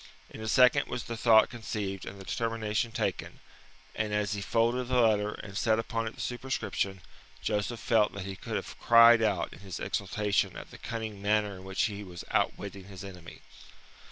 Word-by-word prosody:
In -, -, -9 dB
a 110 Hz, -, -4 dB
second 125 Hz, +2 st, +5 dB
was 120 Hz, -, -4 dB
the 115 Hz, -, -5 dB
thought 110 Hz, -1 st, +5 dB
conceived 105 Hz, -5 st, -4 dB
and 100 Hz, -, -8 dB
the -, -, -9 dB
determination 115 Hz, 0 st, -1 dB
taken, -, -, -3 dB, 0.5 s
and 110 Hz, -1 st, -2 dB
as 105 Hz, 0 st, 0 dB
he 100 Hz, -, -3 dB
folded 120 Hz, +4 st, +1 dB
the 125 Hz, 0 st, +2 dB
letter 105 Hz, -3 st, +3 dB
and 95 Hz, -2 st, -9 dB
set 110 Hz, +1 st, +2 dB
upon 115 Hz, 0 st, -2 dB
it 110 Hz, -, -6 dB
the -, -, -7 dB
superscription, 120 Hz, -6 st, -2 dB, 0.4 s
Joseph 105 Hz, +3 st, -1 dB
felt 110 Hz, -3 st, +3 dB
that 100 Hz, -1 st, -6 dB
he 95 Hz, -1 st, -5 dB
could -, -, -6 dB
have -, -, -5 dB
cried 115 Hz, 0 st, +7 dB
out 100 Hz, -6 st, 0 dB
in -, -, -13 dB
his 95 Hz, -3 st, -7 dB
exultation 105 Hz, 0 st, -1 dB
at -, -, -10 dB
the -, -, -12 dB
cunning 110 Hz, -3 st, -5 dB
manner 105 Hz, 0 st, +1 dB
in 95 Hz, -, -11 dB
which 95 Hz, 0 st, -1 dB
he 105 Hz, -1 st, -2 dB
was 90 Hz, -3 st, -9 dB
outwitting 100 Hz, -1 st, -1 dB
his 95 Hz, 0 st, -10 dB
enemy. 90 Hz, -4 st, -10 dB
105 Hz, 190 wpm, -29 LUFS, 100-115 Hz, 0.5 s, cried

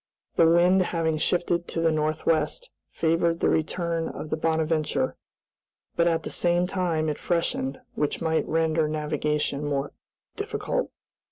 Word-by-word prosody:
The 165 Hz, -, +5 dB
wind 175 Hz, +3 st, +5 dB
having 165 Hz, -3 st, 0 dB
shifted 175 Hz, +1 st, 0 dB
to -, -, -3 dB
the 165 Hz, 0 st, +3 dB
northwest 155 Hz, -, 0 dB, 0.2 s
favored 165 Hz, +1 st, +1 dB
the -, -, +2 dB
return 165 Hz, +1 st, -1 dB
of 155 Hz, -, -7 dB
the -, -, +2 dB
"Bonadventure," 160 Hz, -1 st, 0 dB, 0.8 s
but 170 Hz, 0 st, +3 dB
at 165 Hz, -1 st, +1 dB
the -, -, -5 dB
same 175 Hz, 0 st, +2 dB
time 175 Hz, -4 st, 0 dB
it 150 Hz, -, -2 dB
freshened, 165 Hz, -5 st, -1 dB
which 150 Hz, -, -1 dB
might 160 Hz, -1 st, 0 dB
render 160 Hz, -1 st, +1 dB
navigation 150 Hz, -1 st, -1 dB
more 145 Hz, -1 st, -1 dB, 0.4 s
difficult. -, -, -2 dB
160 Hz, 140 wpm, -26 LUFS, 155-170 Hz, 0.8 s, The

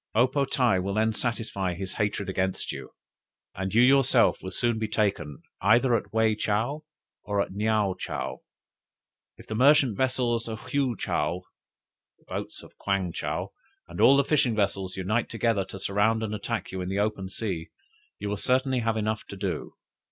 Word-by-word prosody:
O 120 Hz, +3 st, +6 dB
po 140 Hz, +2 st, 0 dB
tae 125 Hz, -8 st, +2 dB
will 100 Hz, +2 st, -2 dB
then 110 Hz, +1 st, +2 dB
satisfy 110 Hz, -6 st, -2 dB
his 95 Hz, +1 st, -5 dB
hatred 105 Hz, -1 st, -1 dB
against 95 Hz, 0 st, -1 dB
you, -, -, -7 dB, 0.6 s
and 95 Hz, 0 st, -3 dB
you 115 Hz, +3 st, +5 dB
yourself 135 Hz, -2 st, +4 dB
will 95 Hz, -, -5 dB
soon 115 Hz, +4 st, 0 dB
be 110 Hz, -, -1 dB
taken 100 Hz, -10 st, -1 dB, 0.2 s
either 120 Hz, +6 st, +4 dB
at -, -, -3 dB
Wei 110 Hz, 0 st, +3 dB
chow 110 Hz, +8 st, -1 dB, 0.4 s
or 100 Hz, -1 st, -1 dB
at -, -, 0 dB
Neaou 105 Hz, -1 st, +1 dB
chow. -, -, -4 dB, 1.0 s
If -, -, -13 dB
the -, -, -5 dB
merchant 130 Hz, -1 st, +5 dB
vessels 120 Hz, -2 st, 0 dB
of 110 Hz, -1 st, -4 dB
Hwy 135 Hz, -5 st, -1 dB
chaou, 90 Hz, +1 st, -1 dB, 0.7 s
the -, -, -31 dB
boats -, -, -5 dB
of -, -, -16 dB
Kwang 100 Hz, -3 st, 0 dB
chow, -, -, -3 dB, 0.4 s
and 85 Hz, +1 st, -5 dB
all 140 Hz, -, +7 dB
the 140 Hz, -, +4 dB
fishing 130 Hz, -5 st, +2 dB
vessels, 95 Hz, -3 st, -1 dB
unite 105 Hz, +5 st, 0 dB
together 115 Hz, -3 st, +1 dB
to 95 Hz, -, -9 dB
surround 105 Hz, +4 st, +1 dB
and 110 Hz, -1 st, -3 dB
attack 105 Hz, 0 st, -3 dB
you 95 Hz, -1 st, -4 dB
in 90 Hz, -, -3 dB
the 95 Hz, -, -2 dB
open 100 Hz, -2 st, -1 dB
sea, 95 Hz, -6 st, -4 dB, 0.5 s
you -, -, -5 dB
will 100 Hz, 0 st, -2 dB
certainly 130 Hz, +3 st, +1 dB
have 115 Hz, -1 st, 0 dB
enough 110 Hz, 0 st, -1 dB
to 100 Hz, -, -8 dB
do. 95 Hz, -2 st, -4 dB
110 Hz, 180 wpm, -27 LUFS, 95-120 Hz, 1.0 s, all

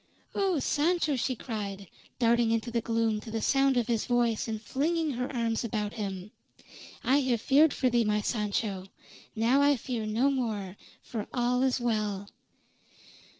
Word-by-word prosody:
"Oh, 385 Hz, -4 st, +1 dB
Sancho!" 310 Hz, +2 st, +1 dB
she 255 Hz, +1 st, -1 dB
cried, 200 Hz, -5 st, -5 dB, 0.3 s
darting 235 Hz, -1 st, +3 dB
into 230 Hz, +1 st, 0 dB
the 235 Hz, 0 st, 0 dB
gloom 225 Hz, -2 st, 0 dB
to 225 Hz, -, -10 dB
the 225 Hz, 0 st, -2 dB
sound 270 Hz, +2 st, +3 dB
of 240 Hz, -, +2 dB
his 230 Hz, -2 st, -1 dB
voice 240 Hz, -3 st, +1 dB
and 220 Hz, -1 st, -3 dB
flinging 310 Hz, +7 st, -1 dB
her 250 Hz, 0 st, -3 dB
arms 230 Hz, -3 st, -1 dB
about 210 Hz, -2 st, -2 dB
him. 195 Hz, -2 st, -5 dB, 0.7 s
"I 270 Hz, -, +4 dB
have 255 Hz, -4 st, +1 dB
feared 290 Hz, +6 st, +4 dB
for 260 Hz, -, 0 dB
thee, 240 Hz, -1 st, +3 dB
my 210 Hz, -1 st, +1 dB
Sancho. 205 Hz, -3 st, -2 dB, 0.5 s
Now 235 Hz, +5 st, +3 dB
I 285 Hz, 0 st, +5 dB
fear 235 Hz, -3 st, -4 dB
no 235 Hz, +6 st, +2 dB
more, 215 Hz, -8 st, -2 dB, 0.3 s
for 220 Hz, -3 st, -5 dB
all 245 Hz, 0 st, +1 dB
is 260 Hz, -1 st, +2 dB
well." 210 Hz, -4 st, -1 dB
235 Hz, 160 wpm, -29 LUFS, 215-260 Hz, 0.7 s, I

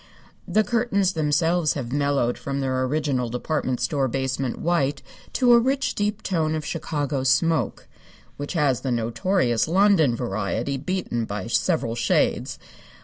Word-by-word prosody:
The 215 Hz, -, +3 dB
curtains 215 Hz, -5 st, +1 dB
themselves 160 Hz, +1 st, +1 dB
have 125 Hz, -5 st, -4 dB
mellowed 140 Hz, -3 st, +1 dB
from 140 Hz, 0 st, -3 dB
their 130 Hz, -1 st, -1 dB
original 135 Hz, -3 st, -1 dB
department 125 Hz, +1 st, -2 dB
store 140 Hz, -3 st, 0 dB
basement 130 Hz, 0 st, -2 dB
white 145 Hz, -5 st, 0 dB, 0.3 s
to 245 Hz, -2 st, +4 dB
a 235 Hz, -, +7 dB
rich, 265 Hz, +3 st, 0 dB
deep 205 Hz, 0 st, -2 dB
tone 160 Hz, -4 st, 0 dB
of 155 Hz, -2 st, -4 dB
Chicago 145 Hz, -5 st, -2 dB
smoke, 160 Hz, +5 st, +1 dB, 0.5 s
which 145 Hz, +4 st, -5 dB
has 145 Hz, -7 st, +1 dB
the 135 Hz, -, -3 dB
notorious 120 Hz, -, +1 dB
London 175 Hz, -, +4 dB
variety 115 Hz, +4 st, -2 dB
beaten 150 Hz, -7 st, -2 dB
by 100 Hz, -2 st, -5 dB
several 115 Hz, 0 st, 0 dB
shades. 120 Hz, -, 0 dB
145 Hz, 140 wpm, -24 LUFS, 130-175 Hz, 0.5 s, a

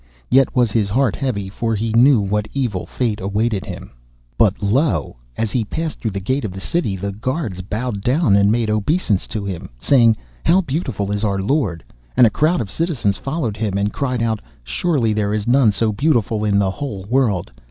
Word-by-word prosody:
Yet 135 Hz, +1 st, +4 dB
was 120 Hz, -4 st, +3 dB
his 105 Hz, -2 st, +1 dB
heart 120 Hz, 0 st, +1 dB
heavy, 110 Hz, -8 st, -2 dB
for 115 Hz, +3 st, -2 dB
he 110 Hz, +1 st, -2 dB
knew 125 Hz, 0 st, +6 dB
what 105 Hz, +1 st, -1 dB
evil 120 Hz, -9 st, -2 dB
fate 115 Hz, -5 st, -2 dB
awaited 105 Hz, +1 st, -1 dB
him. -, -, -8 dB, 0.4 s
But 105 Hz, -1 st, +2 dB
lo! 130 Hz, -, +1 dB, 0.2 s
as 110 Hz, -2 st, -1 dB
he 125 Hz, -, +1 dB
passed 160 Hz, +8 st, -4 dB
through 115 Hz, -, -2 dB
the 100 Hz, -1 st, -4 dB
gate 130 Hz, +8 st, -1 dB
of 100 Hz, -4 st, -4 dB
the 95 Hz, -, -7 dB
city, 115 Hz, -, -1 dB
the 100 Hz, +2 st, -4 dB
guards 110 Hz, -, -3 dB
bowed 105 Hz, +2 st, -3 dB
down 125 Hz, -, +3 dB
and 100 Hz, 0 st, +4 dB
made 115 Hz, -1 st, +1 dB
obeisance 110 Hz, -, 0 dB
to 105 Hz, -2 st, -4 dB
him, 95 Hz, -4 st, -5 dB
saying, 115 Hz, -, +4 dB, 0.3 s
'How 180 Hz, +4 st, +4 dB
beautiful 130 Hz, -, -3 dB
is 105 Hz, +1 st, -2 dB
our 100 Hz, -2 st, +1 dB
lord!' 100 Hz, -, 0 dB, 0.3 s
and 125 Hz, -, +8 dB
a 110 Hz, -, +3 dB
crowd 160 Hz, -, +2 dB
of 100 Hz, -4 st, -5 dB
citizens 130 Hz, -, -1 dB
followed 135 Hz, -7 st, -3 dB
him, 105 Hz, -3 st, -1 dB
and 100 Hz, +1 st, 0 dB
cried 125 Hz, -4 st, -1 dB
out, 110 Hz, -2 st, 0 dB, 0.2 s
'Surely 115 Hz, -, 0 dB
there 105 Hz, 0 st, 0 dB
is 105 Hz, -1 st, -2 dB
none 120 Hz, -2 st, +4 dB
so 110 Hz, +2 st, 0 dB
beautiful 115 Hz, -3 st, +1 dB
in 105 Hz, -1 st, +2 dB
the 100 Hz, -2 st, +2 dB
whole 105 Hz, -6 st, -5 dB
world! 110 Hz, -, +1 dB
110 Hz, 200 wpm, -20 LUFS, 100-130 Hz, 0.4 s, and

